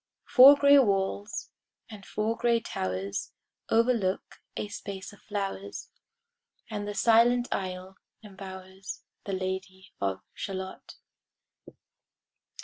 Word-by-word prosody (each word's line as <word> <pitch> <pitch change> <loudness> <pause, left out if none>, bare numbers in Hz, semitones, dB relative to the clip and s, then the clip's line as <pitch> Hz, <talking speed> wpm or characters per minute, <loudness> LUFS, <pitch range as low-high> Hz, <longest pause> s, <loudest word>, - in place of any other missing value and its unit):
Four 270 +3 +9
gray 280 0 +7
walls, 200 -2 0 0.4
and 205 -4 -11
four 215 +2 -1
gray 235 0 +2
towers, 95 - -4 0.4
Overlook 225 -5 +1 0.2
a - - -2
space 200 -1 -7
of 205 - -17
flowers, 200 -1 -5 0.8
And 205 -1 -3
the 205 - -4
silent 240 +2 +4
isle 185 0 -4 0.3
embowers 190 -1 -9 0.2
The 195 - -3
Lady 190 0 -4
of 95 -1 -1
Shalott. 190 -1 -6
195 Hz, 100 wpm, -28 LUFS, 190-225 Hz, 0.8 s, Four